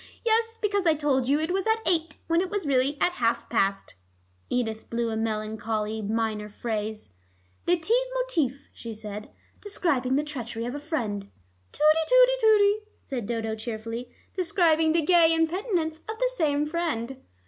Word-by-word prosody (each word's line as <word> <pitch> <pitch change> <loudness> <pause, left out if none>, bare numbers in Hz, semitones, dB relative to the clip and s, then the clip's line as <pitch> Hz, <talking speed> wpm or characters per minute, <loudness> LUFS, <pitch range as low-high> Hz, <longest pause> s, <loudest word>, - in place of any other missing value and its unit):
"Yes, 455 0 +2
because 405 -4 +1
I 320 - +5
told 275 -4 +1
you 285 +2 +3
it 320 +3 -1
was 390 +2 0
at 445 0 +2
eight, 330 -1 0
when 335 +1 +2
it 375 - -2
was 410 -3 -2
really 275 +1 +2
at - - +3
half 230 0 +1
past." 195 -3 0 0.6
Edith 225 -3 -2
blew 235 0 -1
a - - -2
melancholy 220 0 -2
minor 215 0 -1
phrase. 215 - -4 0.6
"Leit 340 -2 +2 0.3
motif," 320 - -1
she 230 -2 -7
said, 210 -1 -7 0.3
"describing 280 -11 0
the 290 - +2
treachery 240 -6 -4
of 245 - -3
a 290 - -4
friend." 220 -10 -3 0.4
"Tooty, 310 +1 +3
tooty, - - +6
tooty," 420 -3 +5 0.2
said 245 -7 -5
Dodo 225 -1 -2
cheerfully, 230 +2 -5 0.2
"describing 335 -4 +3
the 330 -2 +2
gay 330 -1 +5
impenitence 325 -1 0
of 440 - -4
the - - +1
same 295 -5 +1
friend." 300 -6 -2
290 Hz, 160 wpm, -26 LUFS, 225-345 Hz, 0.6 s, tooty